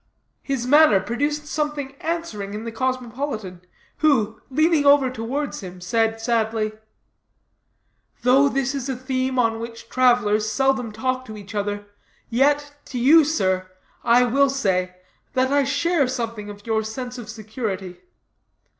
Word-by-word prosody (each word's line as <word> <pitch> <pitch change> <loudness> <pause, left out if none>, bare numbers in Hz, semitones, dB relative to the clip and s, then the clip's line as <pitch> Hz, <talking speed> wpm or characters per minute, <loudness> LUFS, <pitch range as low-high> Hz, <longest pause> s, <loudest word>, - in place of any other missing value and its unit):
His 270 -4 -2
manner 290 -5 +6
produced 290 +9 -2
something 295 -3 -3
answering 315 -13 -3
to - - -3
it - - -5
in - - -8
the 230 - -4
cosmopolitan, 245 -6 -3 0.4
who, 225 -8 +2
leaning 310 +2 +3
over 280 -2 +5
towards 260 +5 -3
him, 180 -1 -9
said 225 +4 0
sadly: 225 -2 0 1.5
"Though 270 +3 +5
this 270 0 -1
is 275 -1 -4
a 265 - -1
theme 260 0 -2
on 225 -2 +2
which 230 0 -8
travelers 235 -4 +3
seldom 265 -3 +1
talk 255 +4 -2
to 215 -3 -9
each 205 +1 -10
other, 205 0 -2 0.5
yet, 290 +4 +2
to 255 - -6
you, 295 +7 +6
sir, 185 -12 0 0.3
I 240 +1 +5
will 275 +3 +3
say, 185 -9 0 0.4
that 260 0 +1
I 285 0 +4
share 285 +2 +1
something 230 -4 -4
of 205 0 -11
your 220 -1 +1
sense 245 +3 -6
of 220 -3 -9
security. 215 -4 -5
245 Hz, 145 wpm, -23 LUFS, 215-275 Hz, 1.5 s, manner